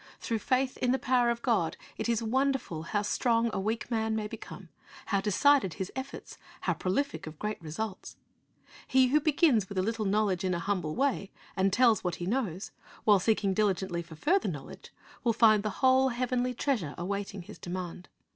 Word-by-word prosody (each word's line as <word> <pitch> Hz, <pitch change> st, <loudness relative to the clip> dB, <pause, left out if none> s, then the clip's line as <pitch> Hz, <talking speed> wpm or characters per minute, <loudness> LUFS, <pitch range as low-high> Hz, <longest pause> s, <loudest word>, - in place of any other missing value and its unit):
Through 230 Hz, -2 st, -2 dB
faith 255 Hz, +4 st, 0 dB
in 250 Hz, -, +1 dB
the 260 Hz, -, +2 dB
power 250 Hz, -2 st, +2 dB
of 235 Hz, 0 st, -2 dB
God, 210 Hz, -10 st, +1 dB, 0.2 s
it -, -, -3 dB
is 230 Hz, -1 st, +1 dB
wonderful 260 Hz, -, 0 dB
how 205 Hz, -1 st, 0 dB
strong 230 Hz, +2 st, +1 dB
a -, -, -1 dB
weak 220 Hz, +4 st, -2 dB
man 220 Hz, -1 st, 0 dB
may 215 Hz, -1 st, -2 dB
become, -, -, -9 dB, 0.4 s
how 200 Hz, -2 st, 0 dB
decided 210 Hz, -, +3 dB
his 190 Hz, 0 st, -4 dB
efforts, 265 Hz, +1 st, -7 dB, 0.2 s
how -, -, +1 dB
prolific 280 Hz, -, -2 dB
of 155 Hz, 0 st, -8 dB
great 210 Hz, +1 st, -4 dB
results. 185 Hz, +6 st, -6 dB, 0.7 s
He 260 Hz, -1 st, +4 dB
who 300 Hz, +4 st, +4 dB
begins 285 Hz, -, +3 dB
with 200 Hz, -, -6 dB
a 185 Hz, -, +2 dB
little 225 Hz, +1 st, -1 dB
knowledge, 200 Hz, -2 st, +1 dB
in 185 Hz, -1 st, 0 dB
a -, -, -2 dB
humble 175 Hz, -4 st, -2 dB
way, 270 Hz, -8 st, 0 dB, 0.3 s
and 195 Hz, 0 st, +2 dB
tells 230 Hz, -1 st, +4 dB
what 180 Hz, -2 st, -1 dB
he 175 Hz, -, -5 dB
knows, 200 Hz, -4 st, -2 dB, 0.3 s
while 205 Hz, -2 st, +5 dB
seeking 200 Hz, -1 st, +1 dB
diligently 190 Hz, -4 st, 0 dB
for 165 Hz, -1 st, -11 dB
further 355 Hz, -, +1 dB
knowledge, -, -, -8 dB, 0.3 s
will 235 Hz, -2 st, +2 dB
find 215 Hz, -2 st, +5 dB
the 215 Hz, -, -2 dB
whole 260 Hz, +4 st, +3 dB
heavenly 250 Hz, 0 st, -1 dB
treasure 225 Hz, -, -1 dB
awaiting 200 Hz, +1 st, -4 dB
his -, -, -12 dB
demand. 180 Hz, 0 st, -6 dB
215 Hz, 185 wpm, -29 LUFS, 190-250 Hz, 0.7 s, while